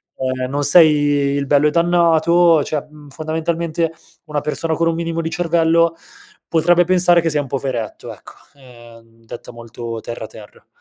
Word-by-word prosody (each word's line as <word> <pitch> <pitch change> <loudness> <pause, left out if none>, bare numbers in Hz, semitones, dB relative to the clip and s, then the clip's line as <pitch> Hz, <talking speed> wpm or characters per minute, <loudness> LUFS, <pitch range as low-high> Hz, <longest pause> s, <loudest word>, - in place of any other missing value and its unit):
ehm, 130 -1 -3
non 145 +2 -2
sei 145 -3 +4
il 140 0 -2
bello 145 +2 +3
e - - +3
dannato 170 -1 +3
cioè 150 0 -4
mhmm, 150 -1 -16
fondamentalmente, 160 +2 -3 0.3
una 150 -2 -3
persona 155 +2 -2
con 165 +1 0
un 165 - 0
minimo 165 0 -3
di 160 - -4
cervello, 165 0 +1 0.5
potrebbe 175 +2 +2
pensare 175 -1 +3
che 165 - -1
sei 150 -2 -1
un 140 - -8
poveretto 130 -5 -5
ecco, - - -14 0.2
ehm, 115 -3 -18
detta 115 - -10
molto 115 -1 -8
terra, 115 -1 -7
terra. 105 -1 -15
155 Hz, 160 wpm, -18 LUFS, 135-165 Hz, 0.5 s, sei